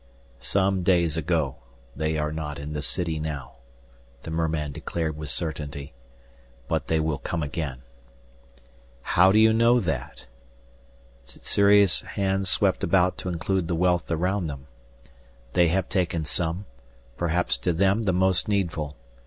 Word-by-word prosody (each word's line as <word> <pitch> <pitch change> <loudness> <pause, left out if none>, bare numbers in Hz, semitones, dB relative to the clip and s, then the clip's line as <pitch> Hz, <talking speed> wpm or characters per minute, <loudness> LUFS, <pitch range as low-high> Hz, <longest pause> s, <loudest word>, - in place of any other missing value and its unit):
"Some 95 +7 +1
days 85 -3 +2
ago. 80 -4 0 0.4
They 80 +1 -1
are 75 0 -1
not 75 -2 -4
in 75 +1 -6
the 75 - -3
city 80 +1 -1
now," 75 -5 -5 0.7
the 80 - -6
merman 80 -2 -1
declared 80 +1 -3
with 75 -1 -7
certainty. 70 0 -3 0.7
"But - - -1
they 80 - +1
will 80 -2 -1
come 85 -2 -3
again." 70 -4 -4 1.2
"How 95 +2 +5
do 105 - +3
you 110 0 +6
know 115 +2 +4
that?" 80 - -4 1.0
Sssuri's 100 +5 +3
hand 95 -1 -1
swept 95 0 +2
about 90 -1 +3
to 90 - -4
include 90 +1 -1
the 85 - -1
wealth 90 0 +1
around 90 +2 0
them. 70 -2 -7 0.9
"They 90 -1 +4
have 90 +2 0
taken 85 -4 -1
some, 80 +7 0 0.5
perhaps 85 +3 0
to 90 - 0
them 95 +5 +2
the 95 - +3
most 95 +2 +2
needful. 85 -8 -1
85 Hz, 140 wpm, -25 LUFS, 75-95 Hz, 1.2 s, you